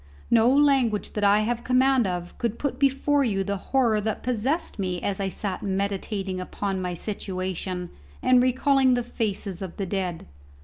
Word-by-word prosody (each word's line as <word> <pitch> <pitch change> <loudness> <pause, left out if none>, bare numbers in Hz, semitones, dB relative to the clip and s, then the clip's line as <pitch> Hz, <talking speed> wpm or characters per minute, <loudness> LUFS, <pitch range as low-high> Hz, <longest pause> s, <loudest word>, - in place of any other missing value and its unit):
No 230 +1 +5
language 270 -6 +2
that 210 - -2
I 205 +1 +5
have 240 +2 -1
command 255 -2 +3
of 175 -1 -4
could 235 -2 -1
put 285 - -3
before 280 +1 +2
you 200 -6 0
the 200 +1 -2
horror 235 -6 +3
that 220 0 -3
possessed 250 +5 -1
me 180 -2 -1
as 200 +1 -2
I 195 -1 -1
sat 190 0 -4
meditating 195 -1 -2
upon 195 +1 -3
my 180 -1 -3
situation 185 -2 -4 0.3
and 255 -1 +4
recalling 260 +1 +3
the 245 - -1
faces 205 -5 -3
of 190 -3 -6
the 195 - -2
dead. 185 -3 -3
210 Hz, 170 wpm, -25 LUFS, 190-250 Hz, 0.3 s, No